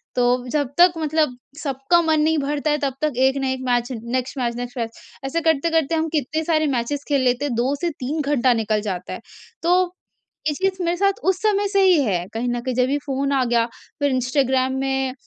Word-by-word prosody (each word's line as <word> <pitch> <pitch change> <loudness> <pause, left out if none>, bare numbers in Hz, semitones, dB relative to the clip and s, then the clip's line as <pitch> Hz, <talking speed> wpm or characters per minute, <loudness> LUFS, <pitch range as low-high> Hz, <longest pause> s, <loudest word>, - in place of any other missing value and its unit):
तो 245 0 +2
जब 290 -2 0
तक 355 0 +7
मतलब 305 -5 0 0.3
सबका 275 +5 +2
मन 315 -1 +2
नहीं 320 +1 +2
भरता 290 +1 -1
है, 295 - +2
तब 275 -3 -2
तक 305 -2 +1
एक 265 +1 +3
न - - -1
एक 260 0 -1
match, 245 0 +1
next 250 +3 -3
match, 235 -2 -1
next 245 +1 -6
match, 230 -1 -4 0.3
ऐसे 330 +5 -1
करते-करते 325 0 +1
हम 320 0 0
कितने 310 +1 -1
सारे 310 -2 +2
मैचेज़ 280 +5 -2
खेल 280 -2 +2
लेते, 250 +3 +1
2 245 +3 0
से 345 - +1
3 295 +5 -2
घंटा 265 -3 +2
निकल 215 -2 0
जाता 180 -1 -5
है। - - -6 0.4
तो, 360 +1 +3 0.6
ये 300 - +1
चीज़ 380 +3 -1
मेरे 345 +1 0
साथ 395 +2 +1
उस 380 - +2
समय 410 -1 +2
से 395 0 +2
ही 365 -5 +5
है 180 -7 0
कहीं 230 +2 -2
ना 240 0 -1
कहीं 255 0 -3
जब 250 +1 +2
ये 285 - +1
फ़ोन 275 0 -1
आ 265 -2 +2
गया, 235 -1 +2 0.3
फिर 285 -1 +1
इंस्टाग्राम 260 0 +1
में 265 -1 -1
275 Hz, 215 wpm, -22 LUFS, 250-315 Hz, 0.6 s, तक